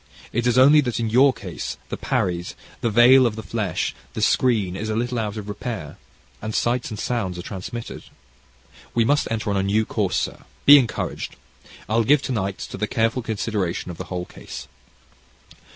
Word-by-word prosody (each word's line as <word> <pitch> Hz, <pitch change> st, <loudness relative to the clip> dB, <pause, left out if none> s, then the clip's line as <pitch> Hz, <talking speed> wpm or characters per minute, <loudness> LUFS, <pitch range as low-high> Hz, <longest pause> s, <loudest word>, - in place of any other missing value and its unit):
It 120 Hz, +2 st, 0 dB
is 120 Hz, 0 st, +2 dB
only 145 Hz, +4 st, +7 dB
that 120 Hz, -5 st, -2 dB
in 115 Hz, -2 st, -1 dB
your 135 Hz, +4 st, +6 dB
case, 125 Hz, -, -6 dB
the -, -, -3 dB
'paries,' 90 Hz, -2 st, -2 dB, 0.3 s
the 115 Hz, -, +1 dB
veil 120 Hz, +4 st, +7 dB
of 110 Hz, -, -3 dB
the 110 Hz, -, -6 dB
flesh, 105 Hz, -7 st, -2 dB, 0.2 s
the -, -, -3 dB
screen, 110 Hz, -8 st, +2 dB
is 110 Hz, +3 st, -4 dB
a 110 Hz, -, -1 dB
little 120 Hz, +1 st, -1 dB
out 105 Hz, -1 st, -3 dB
of 105 Hz, -1 st, -6 dB
repair, 105 Hz, -, -5 dB, 0.4 s
and 110 Hz, 0 st, -4 dB
sights 120 Hz, +1 st, 0 dB
and 110 Hz, -, -6 dB
sounds 105 Hz, -5 st, -2 dB
are 90 Hz, -, -6 dB
transmitted. 105 Hz, +5 st, -7 dB, 0.9 s
We 115 Hz, -1 st, +3 dB
must 145 Hz, +4 st, +2 dB
enter 110 Hz, -2 st, -2 dB
on 100 Hz, -, 0 dB
a -, -, +2 dB
new 105 Hz, +3 st, +1 dB
course, -, -, -1 dB
sir, -, -, -3 dB, 0.2 s
be 145 Hz, +1 st, +10 dB
encouraged. 120 Hz, -4 st, -3 dB, 0.5 s
I'll 115 Hz, +2 st, +2 dB
give 145 Hz, +4 st, +4 dB
to -, -, -3 dB
night 100 Hz, -5 st, -1 dB
to -, -, -5 dB
the 105 Hz, -, 0 dB
careful 115 Hz, +2 st, 0 dB
consideration 105 Hz, -5 st, -2 dB
of 85 Hz, -, -9 dB
the -, -, -4 dB
whole 90 Hz, -1 st, -4 dB
case." -, -, -9 dB
110 Hz, 190 wpm, -23 LUFS, 100-120 Hz, 0.9 s, be